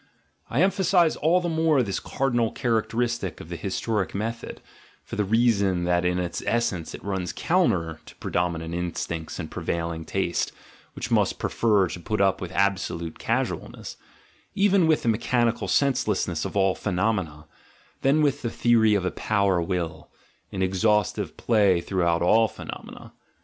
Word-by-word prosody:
I 140 +9 +2
emphasise 190 -3 +3
all 170 +4 +2
the 175 - -2
more 160 -4 +2
this 100 -4 -2
cardi 135 -2 -2
nal 115 -2 +2
characteristic 115 -3 -1
of 80 - -10
the 85 - -4
historic 100 +3 -2
method, 115 +3 -4 0.4
for - - -7
the 105 - +1
reason 100 -4 +2
that 90 0 +1
in 90 0 +1
its 90 -1 -3
essence 100 -8 -1
it - - -12
runs 95 -3 -2
counter 85 - +1
to - - -13
predominant 85 -2 -2
instincts 85 -2 -4
and 80 -4 -6
prevailing 85 -1 -3
taste, 90 0 -1 0.4
which - - -6
must - - +2
prefer 105 -4 +2
to 90 - -6
put 105 +4 -3
up 95 0 +2
with 90 -1 -5
absolute 95 -4 -1
casualness, - - -3 0.6
even 195 -3 +4
with 155 -1 +2
the - - -3
mechanical 115 +1 +1
senseless 130 -7 +1
ness 80 -4 -2
of - - -4
ail 95 -1 +3
phenomena, 90 -7 -2 0.6
than 145 +3 +3
with 140 -2 +1
the 115 - -2
theory 115 -2 +3
of 95 -2 0
a - - 0
power 100 -4 +1
will, 85 -2 -3 0.4
in 95 -1 -2
exhaustive 105 +2 +1
play 100 -6 +3
throughout 85 -2 0
all 110 +5 +5
phenomena. - - -10
100 Hz, 155 wpm, -25 LUFS, 90-120 Hz, 0.6 s, all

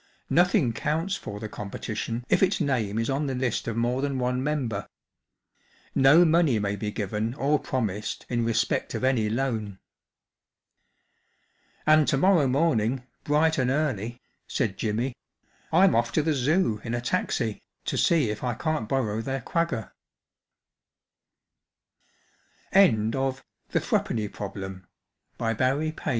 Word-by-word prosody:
Nothing 175 - +3
counts 160 - -1
for 105 - -7
the 110 - -5
competition 110 +3 -5
if - - +2
its 195 0 +3
name 115 -7 0
is 115 0 0
on 140 +2 0
the 135 - -2
list 125 -3 -1
of 115 -1 -2
more 120 +3 0
than 140 -1 -1
one 125 0 0
member. 125 -9 -2 1.0
No 145 +6 +6
money 160 -6 +3
may 100 -1 -1
be 105 +1 -3
given 105 +3 -3
or 145 +1 +1
promised 105 -5 -3
in 120 -1 0
respect 115 0 0
of - - -3
any 125 -5 +2
loan." 110 -5 -2 1.1
" - - -40
And 155 -1 +5
to - - +2
morrow 170 -2 +4
morning, 130 -4 +1 0.2
bright 155 +1 +2
and 125 -1 +2
early/* 125 -5 -1 0.3
said 110 -8 -1
Jimmy, 115 +5 -2 0.3
" - - -35
I'm 185 +4 +5
off 115 +1 +1
to 155 - +2
the 160 0 +1
Zoo 135 - +1
in 115 +1 -2
a 120 - -2
taxi 120 - -1 0.2
to - - -2
see 155 -10 +3
if 105 - -6
I 120 -2 -1
can't 155 -4 -2
borrow 110 -5 0
their 135 +1 -3
125 Hz, 125 wpm, -26 LUFS, 110-150 Hz, 1.1 s, No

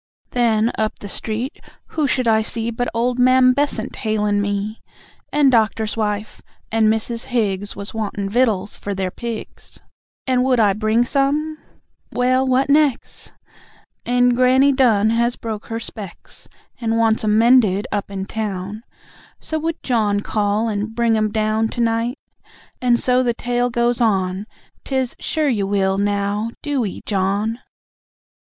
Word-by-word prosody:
Then, 230 -2 +2
up 215 0 -1
the 205 - -9
street, 225 +6 -4 0.3
who 305 -3 0
should 255 -2 0
I 220 -1 +4
see, 230 +1 -2
But 245 +2 -2
old 245 +2 0
Mam 255 0 +5
Bessant 280 -5 -1
hail'n' 210 -2 0
me. 205 +2 -3 0.5
And 290 -2 +4
Doctor's 220 -2 +1
wife, 210 -1 -3 0.3
and 220 0 +3
Mrs. 225 +2 -1
Higgs 205 -5 -1
Was 200 - -6
wantin' 205 -2 -3
vittles 210 -3 +1
for 200 -1 -5
their 190 -1 -2
pigs, 235 0 -7 0.5
And 255 -1 +2
would 255 -2 +2
I 205 -3 +4
bring 215 +3 +1
some? 295 +4 0 0.5
(Well, 255 +1 +2
what 260 +1 +2
nex'?) 285 -3 +1 0.7
And 245 0 +3
Granny 260 +3 +4
Dunn 225 -6 +3
has 235 +1 +1
broke 220 -2 -6
her 225 0 -3
specs, 205 -5 -10 0.3
And 225 -2 0
wants 225 -1 +2
'em 210 0 +2
mended 225 -4 +4
up 205 -1 -2
in 190 -1 -4
town, 205 -1 -4 0.6
So 315 - -3
would 325 +1 -3
John 210 -5 +1
call 210 +1 0
and 215 +1 -3
bring 235 -1 +2
'em 215 0 +1
down 215 +1 +1
To 230 - -7
night...? 230 +3 0 0.6
and 240 -1 +3
so 250 0 +2
the 240 -2 0
tale 245 +1 0
goes 240 +1 0
on, 190 -2 0 0.4
'Tis, 265 -2 -2
"Sure 310 -1 -1
you 205 -6 0
will, 195 -1 +1
now 205 +2 0
DO 280 -5 0
'ee, 190 - -7
John." 205 +3 0
225 Hz, 150 wpm, -20 LUFS, 210-250 Hz, 0.7 s, Mam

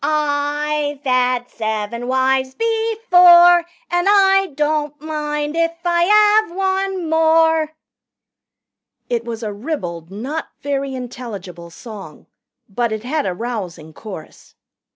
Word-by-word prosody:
I've 295 0 -1
'ad 250 -1 +1
seven 220 +2 -4
wives 260 0 +1
before, 360 -7 +5 0.2
And 350 +2 +1
I 390 -2 +4
don't 295 0 -1
mind 300 -1 -3
if 335 0 0
I 415 +5 +4
'ave 340 - -13
one 380 -2 -1
more 320 -1 +2 0.7
" - - -59
It 235 -1 0
was 230 -1 -6
a 210 -1 -4
ribald, 185 - -5
not 260 +11 -5
very 275 -1 -3
intelligible 210 -9 -8
song. 195 -4 -11 0.4
But 235 +3 -2
it 220 0 -4
had 290 +4 -2
a 180 - -2
rousing 180 -8 -6
chorus. 185 -6 -11
290 Hz, 115 wpm, -19 LUFS, 235-335 Hz, 0.7 s, before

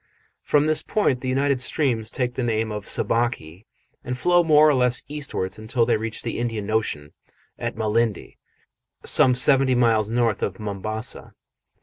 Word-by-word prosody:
From 145 0 +2
this 155 0 +3
point 140 - 0
the 130 - -3
united 135 0 +1
streams 125 -5 0
take 125 0 -2
the 130 - -4
name 110 -2 -1
of 105 -1 -6
Sabaki 115 -6 -2 0.4
and 125 0 -4
flow 175 +6 +3
more 155 -1 +5
or 150 - +4
less 125 -1 +1
eastwards 140 -11 -4
until 115 +2 0
they 115 -1 +2
reach 110 0 -4
the - - -4
Indian 110 -3 -3
Ocean 75 -10 -2 0.5
at - - -4
Malindi, 110 0 -1 0.7
some 125 -1 +4
seventy 130 0 +3
miles 115 -3 +2
north 115 -2 0
of 95 -1 -3
Mombasa. 110 +2 -5
120 Hz, 155 wpm, -23 LUFS, 110-130 Hz, 0.7 s, more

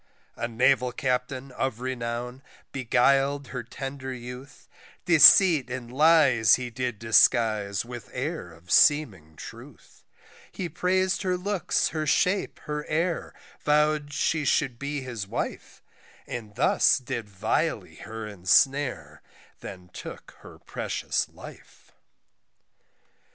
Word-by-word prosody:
A 115 - -3
naval 125 +2 +2
Captain 130 +1 -3
of 125 -2 -3
renown, 125 0 -5 0.3
beguil'd 135 +2 +1
her 125 - -5
tender 135 +3 -7
youth, 125 +2 -10 0.4
Deceit 165 -3 +7
and 125 -1 -7
lies 140 -7 +5
he 125 -1 -6
did 125 -1 -3
disguise 110 -2 +2
with 120 -1 -9
air 135 - -4
of 85 +2 -15
seeming 95 - +3
truth, - - -13 0.5
He 180 -3 -5
prais'd 185 +3 0
her 185 -2 -1
looks, 190 -1 -1
her 155 -1 -3
shape, 185 +6 +1
her 150 -1 -4
air, 165 +2 -2 0.3
vow'd 150 0 +1
she 155 +1 0
should 135 -5 0
be 140 0 -4
his 120 -6 -6
wife, - - -6 0.4
And 110 -3 -7
thus - - +3
did 115 -4 -6
vilely 95 -2 -2
her 110 +1 -8
ensnare 100 - +1 0.4
then 90 -1 -10
took - - -9
her - - -14
precious - - -3
life. - - -15
130 Hz, 115 wpm, -26 LUFS, 115-150 Hz, 0.5 s, Deceit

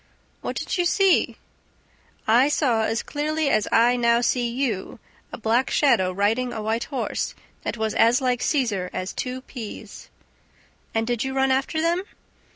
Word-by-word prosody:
"What - - -4
did - - -3
you 350 - +2
see?" 390 0 +3 0.9
"I 245 +6 +5
saw, 240 -7 +2
as 225 +1 -1
clearly 305 0 -1
as 215 - +2
I 235 +2 +4
now 235 -1 +3
see 245 0 +1
you, 235 -6 -2 0.3
a - - -6
black 235 +4 +1
shadow 190 -11 +3
riding 220 +6 0
a 225 -2 -4
white 225 +2 -1
horse 270 -3 -3 0.3
that - - -4
was 220 0 -1
as 235 +2 +4
like 250 -2 0
Cesar 215 -11 0
as 185 +1 -4
two 255 0 -4
peas!" 240 -5 -9 0.9
"And 225 0 +1
did 240 -1 -1
you 265 0 -3
run 265 0 +2
after 270 +4 0
them?" 340 +2 +1
245 Hz, 160 wpm, -24 LUFS, 225-270 Hz, 0.9 s, I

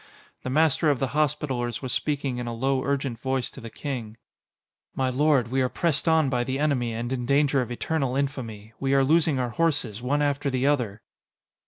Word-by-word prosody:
The - - -4
Master 155 +2 +3
of 145 - +2
the 135 0 -1
Hospitallers 140 -5 -1
was 130 - -3
speaking 140 -4 -1
in 120 - -4
a 120 - -3
low, 130 +2 0
urgent 135 -4 -1
voice 130 -1 -1
to - - -11
the 115 - -7
King: 120 -5 -5 0.8
"My 130 -1 0
lord, 135 -3 +2
we 130 +2 +1
are 130 - +1
pressed 165 +1 0
on 160 -2 +4
by 125 -2 0
the 130 +2 -2
enemy 140 -5 +1
and 120 +3 -3
in 125 -2 -3
danger 140 0 +3
of 125 - -4
eternal 135 +1 -1
infamy. 115 -6 -3
We 135 0 +1
are 135 - +5
losing 155 -1 +3
our 125 -2 -1
horses, 140 -9 0
one 145 +4 +1
after 145 0 0
the 130 0 0
other!" 120 -8 0
135 Hz, 200 wpm, -26 LUFS, 120-145 Hz, 0.8 s, are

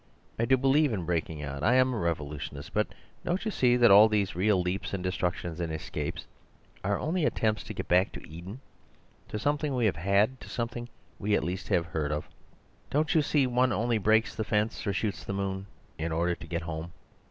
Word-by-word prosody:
I 115 - +3
do 130 +2 +4
believe 135 +2 +3
in 95 -6 -2
breaking 80 -3 -2
out; 70 -1 -5
I 115 +9 +4
am 130 0 +4
a - - -2
revolutionist. 75 -4 -4
But - - +2 0.4
don't 180 +5 -1
you 215 - 0
see 125 -8 +3
that 120 -3 +6
all 105 +3 +9
these 105 -4 0
real 95 +2 +3
leaps 90 +2 -2
and 90 - -4
destructions 90 -2 -2
and 85 -2 -2
escapes 80 -1 -4 0.6
are 100 +1 +1
only 165 +3 -1
attempts 110 -7 +1
to - - -6
get - - -4
back 90 +3 +3
to - - -9
Eden— 90 +10 -9 0.7
to - - -4
something 145 +3 0
we 120 -2 +2
have 95 -8 +1
had, 100 +9 +2
to - - -10
something 120 0 -4 0.3
we 105 +1 +1
at - - +1
least 90 +2 -3
have 85 - +2
heard 80 -3 -2
of? 75 0 -3 0.6
Don't 150 +3 +1
you 160 - +5
see 145 -1 +2
one 125 0 +2
only 115 0 +1
breaks 110 +2 +3
the 110 - -2
fence 105 +3 -1
or - - +2
shoots 95 -4 -2
the - - -4
moon 95 0 -3 0.3
in 80 +1 -2
order 85 +2 +1
to 80 - -9
get 85 +1 -3
HOME? 80 +1 -5
100 Hz, 210 wpm, -29 LUFS, 85-120 Hz, 0.7 s, all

